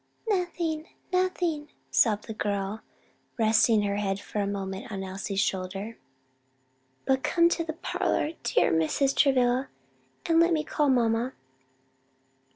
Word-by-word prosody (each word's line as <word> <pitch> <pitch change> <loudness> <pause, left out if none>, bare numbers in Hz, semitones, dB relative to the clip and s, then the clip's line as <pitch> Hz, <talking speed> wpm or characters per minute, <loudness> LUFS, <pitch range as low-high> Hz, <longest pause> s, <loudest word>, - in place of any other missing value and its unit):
"Nothing! 345 -5 -1 0.3
nothing!" 350 -5 0 0.2
sobbed 210 -3 +3
the 220 - -6
girl, 205 0 -2 0.6
resting 220 -1 +4
her 200 0 -1
head 195 -1 -1
for 210 - -5
a 200 - 0
moment 195 +1 -4
on 195 -2 -4
Elsie's 195 +1 -4
shoulder; 195 +4 -2 1.1
"But 265 0 +2
come 340 +5 +1
into 340 0 +3
the 320 -1 -4
parlor, 310 -1 -1
dear - - +2
Mrs. 165 - +1
Travilla, 260 -1 +3 0.6
and 330 0 +3
let 340 +1 +4
me 310 -1 +1
call 295 -1 0
mamma." 240 0 +2
235 Hz, 130 wpm, -27 LUFS, 200-310 Hz, 1.1 s, resting